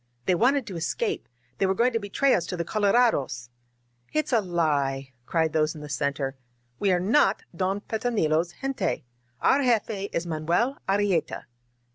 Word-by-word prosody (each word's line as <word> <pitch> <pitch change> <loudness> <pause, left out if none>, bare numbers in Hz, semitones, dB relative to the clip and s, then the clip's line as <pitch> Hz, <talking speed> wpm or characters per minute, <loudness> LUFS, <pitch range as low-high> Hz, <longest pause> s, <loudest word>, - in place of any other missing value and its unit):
"They 185 - +3
wanted 250 +7 +3
to 190 - -7
escape! 410 - -2 0.3
They 195 - +3
were 190 - +1
going 240 +4 +2
to 230 - +1
betray 225 +7 +1
us 170 - +1
to 180 - -4
the 170 - -2
colorados!" 200 - +1 0.6
"It's 305 -3 -1
a 230 - +4
lie 140 -7 0
!" 120 - -42
cried 160 -2 +1
those 155 0 +1
in 150 - -9
the 150 - -8
center. 140 -1 -2 0.4
"We 200 - +2
are 180 - +3
not 200 +2 +3
Don 190 +3 -1
Petronilo's 180 -8 0
gente! 260 - -1 0.4
Our 275 +2 +4
jefe 220 -5 0
is 170 - -2
Manuel 170 - 0
Arrieta 195 -5 +1
185 Hz, 165 wpm, -26 LUFS, 155-230 Hz, 0.6 s, a